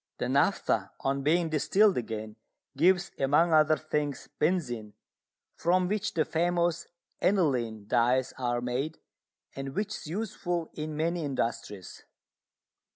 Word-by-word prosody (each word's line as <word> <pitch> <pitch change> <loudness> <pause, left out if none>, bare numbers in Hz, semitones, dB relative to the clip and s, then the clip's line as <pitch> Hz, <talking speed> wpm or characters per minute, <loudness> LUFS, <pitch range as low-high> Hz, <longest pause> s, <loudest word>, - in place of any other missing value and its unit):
The - - -2
naphtha, - - +1
on 135 +1 0
being 165 +4 +2
distilled 190 +7 +3
again, 110 -3 -4 0.4
gives, 175 +5 +3
among 150 +5 +3
other 155 0 +5
things, 150 -2 -3
benzine, 125 - 0 0.6
from 180 +2 +2
which 210 0 -2
the 155 -2 +2
famous 170 0 0 0.3
aniline 125 - +1
dyes 125 +3 +2
are 120 -1 0
made, 130 +6 -2 0.6
and 135 0 -5
which 210 0 -1
is - - -7
useful 175 -2 -3
in 155 0 -5
many 165 +2 0
industries. 115 - -4
155 Hz, 120 wpm, -29 LUFS, 125-175 Hz, 0.6 s, other